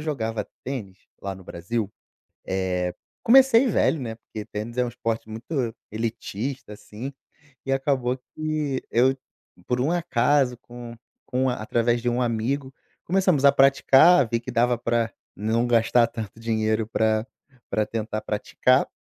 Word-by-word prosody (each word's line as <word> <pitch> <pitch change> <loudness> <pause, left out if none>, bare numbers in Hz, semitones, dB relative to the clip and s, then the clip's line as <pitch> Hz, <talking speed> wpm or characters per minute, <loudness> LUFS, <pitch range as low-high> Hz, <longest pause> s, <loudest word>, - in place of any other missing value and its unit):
jogava 115 -8 -2 0.2
tênis 110 -9 -5 0.2
lá 100 -1 -4
no 95 - -12
Brasil. 100 +5 -4 0.5
Eh, 90 -1 -1 0.3
comecei 260 0 +6
velho, 175 - +2
né, 115 -3 -4
porque 110 -1 -9
tênis 115 +4 -6
é 125 - +3
um 120 - -2
esporte 115 -2 -3
muito 115 +1 -3 0.2
elitista, 115 +2 -4
assim 110 +6 -8 0.5
e 135 - 0
acabou 135 -2 +1 0.2
que 155 -3 -2
eu, 130 +3 +3 0.5
por 125 - 0
um 140 +6 +1
acaso, 145 -6 +2
com 120 -1 -10 0.3
com 130 +1 +1
a 125 - 0
através 120 +2 +1
de 120 - 0
um 120 +1 +1
amigo, 130 +4 -1 0.3
começamos 180 -6 +2
a 140 - +8
praticar, 135 +3 +6
vi 115 -1 0
que 125 - -7
dava 120 0 +2
pra 115 -1 0 0.2
não 110 +4 +1
gastar 115 0 +4
tanto 115 -1 -7
dinheiro 110 -1 0
pra 110 0 +1 0.4
pra 110 - +1
tentar 110 -1 -3
praticar 125 +5 +2
120 Hz, 145 wpm, -25 LUFS, 110-135 Hz, 0.5 s, a